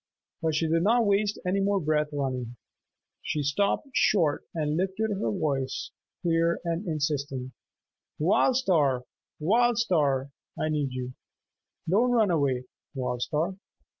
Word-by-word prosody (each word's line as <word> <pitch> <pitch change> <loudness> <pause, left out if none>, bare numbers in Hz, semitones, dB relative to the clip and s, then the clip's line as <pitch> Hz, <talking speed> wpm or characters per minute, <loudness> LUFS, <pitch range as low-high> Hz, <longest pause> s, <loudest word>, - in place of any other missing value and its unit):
But 160 -2 0
she 160 +1 +1
did 165 +1 +2
not 230 +5 +3
waste 205 +1 +2
any 185 +2 +1
more 200 0 +2
breath 150 -2 +1
running. 130 -4 -3 0.7
She 150 - -2
stopped 200 - 0
short 165 -13 +2
and 150 -2 -1
lifted 190 +5 -1
her 190 - -1
voice, 135 +3 -2 0.3
clear 170 0 +2
and 170 +4 -2
insistent, 140 -4 -2 0.7
"Wild 215 - +3
Star! 150 - +2 0.4
Wild 230 +8 +3
Star! 145 - +1 0.3
I 155 - 0
need 145 -3 0
you! 125 0 -5 0.7
Don't 215 +9 +3
run 225 -6 +3
away. 140 -6 +1 0.3
Wild 125 -2 -2
Star!" 165 +8 -1
160 Hz, 135 wpm, -27 LUFS, 140-195 Hz, 0.7 s, not